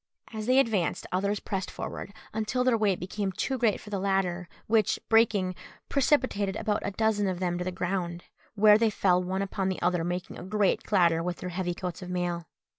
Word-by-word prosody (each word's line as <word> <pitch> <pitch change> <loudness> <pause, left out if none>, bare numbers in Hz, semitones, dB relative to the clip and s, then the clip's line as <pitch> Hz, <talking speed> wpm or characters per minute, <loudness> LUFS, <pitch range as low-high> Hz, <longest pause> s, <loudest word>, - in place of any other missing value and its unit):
As 215 0 -4
they 255 +1 +4
advanced, 215 - +1
others 200 +3 0
pressed 190 -2 -3
forward, - - -6 0.2
until 220 +4 0
their 250 -2 +3
weight 205 -4 +1
became 195 +2 -3
too 255 +7 -2
great 225 -4 +2
for 210 - -12
the 200 - -1
ladder, 185 -3 0 0.2
which, 220 -2 +2
breaking, 210 -5 +3 0.4
precipitated 260 -8 +1
about 210 -1 -1
a - - -1
dozen 205 0 +1
of 185 -2 -2
them 175 -1 -1
to - - -1
the 185 - -2
ground, 175 -1 -3 0.3
where 210 0 +6
they 225 -1 +4
fell 180 -3 +2
one 190 +2 -1
upon 190 -1 -2
the 185 - -2
other, 175 -1 +1
making 175 +2 -4
a - - -7
great 205 +1 +1
clatter 170 -5 +3
with 175 +1 -3
their 180 - -5
heavy 180 0 -2
coats 180 -1 -5
of 180 - -7
mail. 175 -2 -2
195 Hz, 200 wpm, -28 LUFS, 180-215 Hz, 0.4 s, where